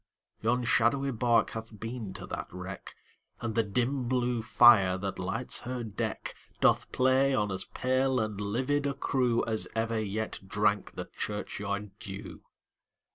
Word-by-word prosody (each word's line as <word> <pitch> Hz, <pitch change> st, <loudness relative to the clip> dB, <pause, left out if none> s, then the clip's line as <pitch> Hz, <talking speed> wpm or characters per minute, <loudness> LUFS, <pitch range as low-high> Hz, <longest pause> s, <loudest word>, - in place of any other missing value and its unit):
Yon 120 Hz, +3 st, +1 dB
shadowy 135 Hz, +4 st, +2 dB
bark 120 Hz, 0 st, +2 dB
hath 110 Hz, -1 st, -7 dB
been 115 Hz, -2 st, -5 dB
to -, -, -7 dB
that -, -, -5 dB
wreck, 90 Hz, +1 st, -8 dB, 0.4 s
And 115 Hz, -2 st, -3 dB
the 115 Hz, -, +3 dB
dim 125 Hz, +4 st, -1 dB
blue 125 Hz, -2 st, +1 dB
fire, 110 Hz, -5 st, +6 dB
that 95 Hz, -1 st, -4 dB
lights 95 Hz, +7 st, -1 dB
her 125 Hz, 0 st, -4 dB
deck, 110 Hz, -3 st, -4 dB, 0.3 s
Doth -, -, +3 dB
play 130 Hz, +1 st, +3 dB
on 105 Hz, -4 st, 0 dB
as 95 Hz, -, -3 dB
pale 130 Hz, 0 st, +1 dB
and 110 Hz, -2 st, -2 dB
livid 130 Hz, +8 st, 0 dB
a 140 Hz, -, -2 dB
crewAs 120 Hz, -5 st, +1 dB
ever 115 Hz, 0 st, 0 dB
yet 110 Hz, +1 st, -3 dB
drank 105 Hz, 0 st, +1 dB
the -, -, -4 dB
churchyard 105 Hz, -1 st, -3 dB
dew. 95 Hz, -1 st, -8 dB
115 Hz, 145 wpm, -30 LUFS, 105-125 Hz, 0.4 s, fire